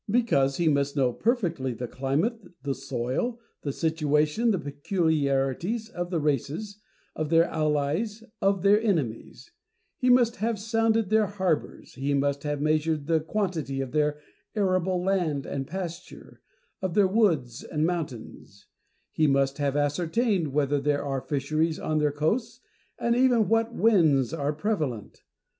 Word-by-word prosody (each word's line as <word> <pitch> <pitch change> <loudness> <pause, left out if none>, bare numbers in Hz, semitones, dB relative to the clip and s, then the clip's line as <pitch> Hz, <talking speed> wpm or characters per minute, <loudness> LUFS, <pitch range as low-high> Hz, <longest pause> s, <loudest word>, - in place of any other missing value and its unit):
Because 170 - +2
he 170 - +1
must 140 -1 +1
know 130 -3 +2
perfectly 170 - 0
the 125 0 -5
climate, 150 - -1 0.2
the 140 -1 -1
soil, 135 - -3 0.2
the 140 - -2
situation, 155 - +1
the 205 - +2
peculiarities, 155 - -1
of 175 -6 -4
the 175 -3 0
races, 150 - -2 0.4
of 155 -1 -2
their 165 0 +5
allies, 155 +9 -1 0.2
of 195 -1 +2
their 205 +2 +5
enemies; 170 - -2 0.5
he 255 -3 +2
must 245 -2 +4
have 225 0 -1
sounded 225 0 +1
tlieir 215 -1 +3
harbours, 185 -6 -2
he 140 +1 -1
must 140 0 0
have 145 -1 -2
measured 155 0 0
the 165 +1 +2
quantity 160 -6 -2
of 135 -2 -3
their 150 -1 +1 0.4
arable 185 -3 +1
land 175 -7 0
and 135 -1 -4
pasture, 180 0 -7 0.4
of 185 -3 -2
their 205 -2 +5
woods 165 - +1
and 155 0 -1
mountains; 135 - -5 0.5
he 155 - +2
must 140 0 +1
have 140 -1 0
ascertained 170 - +1
whether 145 0 0
there 145 0 0
are 135 -2 -2
fisheries 155 +4 -1
on 155 0 0
their 150 -1 +2
coasts, 160 - -1 0.4
and 235 0 +1
even 245 -4 +4
what 225 +1 +1
winds 160 - +3
are 145 -2 -1
prevalent. 150 - -3
160 Hz, 145 wpm, -27 LUFS, 140-205 Hz, 0.5 s, their